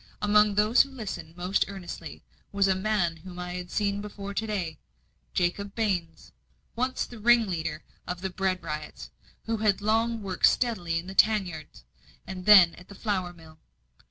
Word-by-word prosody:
Among 210 Hz, 0 st, +4 dB
those 210 Hz, +4 st, +5 dB
who 275 Hz, -, -1 dB
listened 195 Hz, -10 st, -7 dB
most 180 Hz, +2 st, +1 dB
earnestly, 175 Hz, -5 st, -8 dB, 0.3 s
was 200 Hz, -1 st, +2 dB
a 190 Hz, -, +4 dB
man 190 Hz, -4 st, 0 dB
whom 175 Hz, +2 st, -11 dB
I 180 Hz, 0 st, -5 dB
had 180 Hz, 0 st, -6 dB
seen 205 Hz, -1 st, -1 dB
before 200 Hz, -1 st, -7 dB
to 220 Hz, +2 st, -2 dB
day 180 Hz, -7 st, -3 dB, 0.6 s
Jacob 195 Hz, +3 st, -1 dB
Baines, 190 Hz, -7 st, -2 dB, 0.4 s
once 255 Hz, +2 st, -1 dB
the 240 Hz, -, -11 dB
ringleader 190 Hz, -9 st, +2 dB, 0.2 s
of 180 Hz, 0 st, -4 dB
the 190 Hz, 0 st, -3 dB
bread 185 Hz, 0 st, -1 dB
riots, 150 Hz, -1 st, -6 dB, 0.3 s
who 225 Hz, 0 st, -2 dB
had 210 Hz, -2 st, +2 dB
long 225 Hz, +1 st, +1 dB
worked 190 Hz, -2 st, +3 dB
steadily 185 Hz, -10 st, 0 dB
in 165 Hz, -, -4 dB
the 190 Hz, -, -7 dB
tan 215 Hz, 0 st, +4 dB
yard, 160 Hz, -3 st, -7 dB, 0.6 s
and 185 Hz, 0 st, -7 dB
then 190 Hz, -5 st, +9 dB
at 180 Hz, -, -16 dB
the 200 Hz, -, -12 dB
flour 190 Hz, -4 st, -2 dB
mill. 160 Hz, -2 st, -16 dB
195 Hz, 170 wpm, -27 LUFS, 175-210 Hz, 0.6 s, then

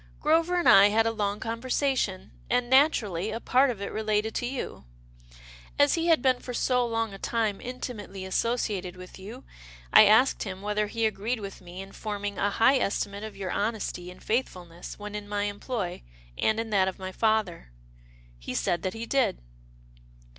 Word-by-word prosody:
" -, -, -26 dB
Grover 330 Hz, +4 st, +2 dB
and 350 Hz, -, +1 dB
I 195 Hz, +1 st, +9 dB
had 220 Hz, +2 st, +2 dB
a 225 Hz, -, +2 dB
long 205 Hz, -2 st, -2 dB
conversation, 230 Hz, -3 st, -1 dB, 0.2 s
and 245 Hz, 0 st, +1 dB
naturally 220 Hz, -, +3 dB
a 225 Hz, +1 st, -3 dB
part 260 Hz, +3 st, +3 dB
of 210 Hz, -5 st, -4 dB
it -, -, -4 dB
related 215 Hz, 0 st, -1 dB
to 245 Hz, -, -2 dB
you. 250 Hz, -, -5 dB, 0.9 s
As 285 Hz, 0 st, +5 dB
he 335 Hz, 0 st, 0 dB
had 325 Hz, -6 st, +4 dB
been 255 Hz, -2 st, +3 dB
for 250 Hz, -, -6 dB
so 250 Hz, 0 st, +2 dB
long 225 Hz, -2 st, -2 dB
a 195 Hz, -, -9 dB
time 220 Hz, -3 st, -1 dB
intimately 215 Hz, -6 st, -6 dB
associated 190 Hz, -3 st, -1 dB
with 185 Hz, +1 st, -12 dB
you, 220 Hz, +7 st, -9 dB, 0.5 s
I 215 Hz, -, +10 dB
asked 220 Hz, +6 st, +4 dB
him 190 Hz, -1 st, -5 dB
whether 210 Hz, 0 st, 0 dB
he 225 Hz, +2 st, -1 dB
agreed 220 Hz, +3 st, -1 dB
with 200 Hz, -2 st, -8 dB
me 180 Hz, +2 st, -8 dB
in 195 Hz, -, -13 dB
forming 205 Hz, -2 st, -5 dB
a 205 Hz, -, +2 dB
high 255 Hz, +6 st, +4 dB
estimate 200 Hz, -1 st, -2 dB
of 215 Hz, -2 st, -8 dB
your 190 Hz, -2 st, -4 dB
honesty 205 Hz, -4 st, -2 dB
and 180 Hz, -, -13 dB
faith 245 Hz, +4 st, +1 dB
fulness 175 Hz, -1 st, -10 dB
when 210 Hz, 0 st, -8 dB
in 210 Hz, -1 st, -6 dB
my 205 Hz, 0 st, -1 dB
employ, 205 Hz, -2 st, -3 dB, 0.3 s
and 220 Hz, 0 st, +1 dB
in 225 Hz, -1 st, -4 dB
that 190 Hz, -2 st, +3 dB
of 190 Hz, -, -3 dB
my 190 Hz, 0 st, -6 dB
father. 215 Hz, -, 0 dB, 0.7 s
He -, -, -6 dB
said 170 Hz, -, 0 dB
that 185 Hz, +3 st, -3 dB
he 225 Hz, +1 st, -5 dB
did." 270 Hz, -, +1 dB
215 Hz, 190 wpm, -27 LUFS, 195-245 Hz, 0.9 s, I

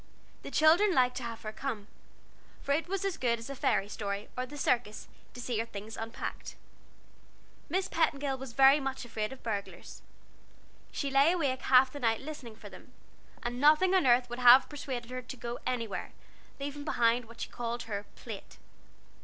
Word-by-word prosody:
The -, -, -7 dB
children 340 Hz, +5 st, +5 dB
liked 250 Hz, -1 st, +3 dB
to 255 Hz, -, -5 dB
have 230 Hz, -1 st, -6 dB
her 215 Hz, -, -4 dB
come, 220 Hz, -3 st, -4 dB, 0.8 s
for 280 Hz, -, -2 dB
it 315 Hz, +4 st, +1 dB
was 390 Hz, +1 st, -2 dB
as 390 Hz, -, -1 dB
good 235 Hz, -2 st, +1 dB
as 230 Hz, +4 st, -8 dB
a -, -, -5 dB
fairy 200 Hz, -, +1 dB
story, 200 Hz, 0 st, -4 dB
or 255 Hz, 0 st, -3 dB
the 290 Hz, +3 st, -9 dB
circus, 235 Hz, -6 st, 0 dB, 0.3 s
to -, -, -8 dB
see 240 Hz, -2 st, -2 dB
her 225 Hz, -, 0 dB
things 210 Hz, +1 st, -8 dB
unpacked. 225 Hz, 0 st, -6 dB, 1.1 s
Miss 370 Hz, +4 st, 0 dB
Petingill 280 Hz, -4 st, 0 dB
was 265 Hz, -3 st, -8 dB
very 270 Hz, +3 st, +7 dB
much 270 Hz, -2 st, -4 dB
afraid 215 Hz, -1 st, -3 dB
of 265 Hz, -, -11 dB
burglars; 205 Hz, -3 st, -5 dB, 0.9 s
she 280 Hz, -2 st, -3 dB
lay 275 Hz, +4 st, +5 dB
awake 275 Hz, -7 st, 0 dB
half 260 Hz, 0 st, +5 dB
the 285 Hz, -, -7 dB
night 225 Hz, -4 st, +1 dB
listening 270 Hz, -6 st, -8 dB
for -, -, -12 dB
them -, -, -14 dB, 0.5 s
and 245 Hz, +1 st, -3 dB
nothing 310 Hz, +6 st, +5 dB
on 370 Hz, -7 st, +4 dB
earth 245 Hz, 0 st, +5 dB
would 240 Hz, +1 st, -6 dB
have 250 Hz, +1 st, +8 dB
persuaded 260 Hz, -5 st, -6 dB
her 255 Hz, 0 st, -4 dB
to 255 Hz, +1 st, -9 dB
go 240 Hz, 0 st, -5 dB
anywhere, 230 Hz, -5 st, -3 dB, 0.5 s
leaving 285 Hz, +1 st, -5 dB
behind 240 Hz, -4 st, +2 dB
what 230 Hz, +1 st, -15 dB
she -, -, -4 dB
called 240 Hz, 0 st, -4 dB
her 205 Hz, -2 st, -5 dB
"Plate." -, -, -9 dB
250 Hz, 185 wpm, -31 LUFS, 230-280 Hz, 1.1 s, have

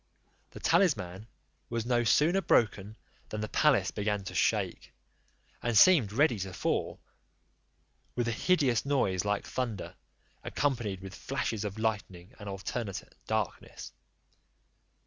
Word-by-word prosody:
The -, -, -11 dB
talisman 115 Hz, -, +1 dB, 0.4 s
was 115 Hz, -1 st, -2 dB
no 120 Hz, -1 st, +2 dB
sooner 165 Hz, +10 st, +3 dB
broken 105 Hz, -, +1 dB, 0.3 s
than 105 Hz, -, -4 dB
the 105 Hz, -, -2 dB
palace 150 Hz, +2 st, +3 dB
began 105 Hz, -1 st, -1 dB
to 95 Hz, -, -7 dB
shake, -, -, 0 dB, 0.7 s
and 120 Hz, -2 st, +1 dB
seemed 145 Hz, -, +6 dB
ready 125 Hz, -1 st, +2 dB
to 95 Hz, 0 st, -5 dB
fall, -, -, -1 dB, 1.2 s
with 120 Hz, -1 st, 0 dB
a -, -, +1 dB
hideous 135 Hz, -4 st, +2 dB
noise 105 Hz, -10 st, +1 dB
like 105 Hz, 0 st, 0 dB
thunder, 115 Hz, -7 st, -4 dB, 0.5 s
accompanied 115 Hz, -9 st, -1 dB
with 95 Hz, 0 st, -8 dB
flashes 110 Hz, +2 st, -3 dB
of 105 Hz, 0 st, -4 dB
lightning, 105 Hz, -3 st, -3 dB
and 105 Hz, -1 st, -7 dB
alternate 95 Hz, 0 st, -5 dB
darkness. -, -, -3 dB
110 Hz, 125 wpm, -30 LUFS, 100-130 Hz, 1.2 s, seemed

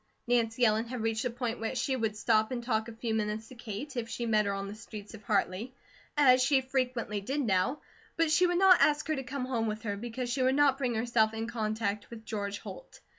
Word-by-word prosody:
Nancy 240 Hz, 0 st, +2 dB
Ellen 220 Hz, +1 st, +2 dB
had 250 Hz, -1 st, -4 dB
reached 225 Hz, 0 st, 0 dB
the 250 Hz, -, 0 dB
point 240 Hz, 0 st, -3 dB
where 225 Hz, +3 st, -3 dB
she 260 Hz, +2 st, 0 dB
would 220 Hz, -4 st, -1 dB
stop 220 Hz, -1 st, +2 dB
and 245 Hz, -2 st, -4 dB
talk 220 Hz, -2 st, 0 dB
a -, -, -7 dB
few 225 Hz, 0 st, -3 dB
minutes 215 Hz, 0 st, -2 dB
to -, -, -11 dB
Kate, 240 Hz, +4 st, -7 dB
if 235 Hz, -2 st, -3 dB
she 235 Hz, -, -3 dB
met 215 Hz, -2 st, +2 dB
her -, -, +1 dB
on 195 Hz, 0 st, -4 dB
the 200 Hz, -, -6 dB
streets 215 Hz, -1 st, -10 dB
of 215 Hz, -, -10 dB
Hartley, 205 Hz, +4 st, -1 dB, 0.4 s
as 255 Hz, -3 st, +6 dB
she 270 Hz, +1 st, +4 dB
frequently 255 Hz, -5 st, -2 dB
did 270 Hz, +8 st, -2 dB
now; 210 Hz, +4 st, +1 dB, 0.4 s
but 330 Hz, -1 st, +2 dB
she 360 Hz, +3 st, +5 dB
would 350 Hz, 0 st, +1 dB
not 375 Hz, -1 st, +7 dB
ask 295 Hz, 0 st, +3 dB
her 310 Hz, -, +2 dB
to 270 Hz, -, -3 dB
come 260 Hz, 0 st, -4 dB
home 235 Hz, -3 st, -1 dB
with 215 Hz, +1 st, -4 dB
her, 205 Hz, -2 st, -2 dB
because 240 Hz, +3 st, -4 dB
she 265 Hz, -, -1 dB
would 260 Hz, +1 st, +3 dB
not 285 Hz, -2 st, +4 dB
bring 250 Hz, -4 st, 0 dB
herself 220 Hz, -1 st, +2 dB
in 225 Hz, 0 st, -2 dB
contact 215 Hz, -2 st, -2 dB
with 225 Hz, -1 st, -10 dB
George 200 Hz, -2 st, -3 dB
Holt. -, -, -10 dB
230 Hz, 240 wpm, -30 LUFS, 215-255 Hz, 0.4 s, not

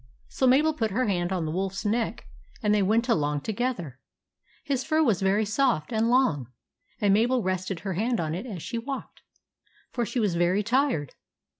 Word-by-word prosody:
So 260 Hz, -, +1 dB
Mabel 295 Hz, +5 st, +4 dB
put 225 Hz, -7 st, -1 dB
her 240 Hz, +6 st, 0 dB
hand 180 Hz, -4 st, 0 dB
on 180 Hz, -4 st, -1 dB
the 155 Hz, -, -2 dB
wolf's 195 Hz, +4 st, -3 dB
neck 225 Hz, +2 st, -1 dB, 0.4 s
and 210 Hz, 0 st, +3 dB
they 210 Hz, -, +3 dB
went 220 Hz, +5 st, +2 dB
along 150 Hz, -, +1 dB
together. 210 Hz, -, -3 dB, 0.6 s
His 275 Hz, -4 st, -1 dB
fur 315 Hz, +3 st, +2 dB
was 220 Hz, -, +2 dB
very 200 Hz, +3 st, +2 dB
soft 230 Hz, -, 0 dB
and 225 Hz, +1 st, +2 dB
long, 200 Hz, -, +2 dB, 0.5 s
and 200 Hz, -2 st, +3 dB
Mabel 235 Hz, +3 st, +2 dB
rested 185 Hz, -1 st, -2 dB
her 195 Hz, -1 st, -3 dB
hand 225 Hz, +6 st, 0 dB
on 155 Hz, -2 st, -2 dB
it 190 Hz, +9 st, -5 dB
as 190 Hz, -8 st, -6 dB
she 235 Hz, -1 st, -3 dB
walked, 270 Hz, +3 st, -7 dB, 0.7 s
for 240 Hz, -, -1 dB
she 235 Hz, +3 st, -2 dB
was 210 Hz, -5 st, +1 dB
very 175 Hz, +4 st, +2 dB
tired. 245 Hz, -, 0 dB
210 Hz, 185 wpm, -26 LUFS, 185-245 Hz, 0.7 s, Mabel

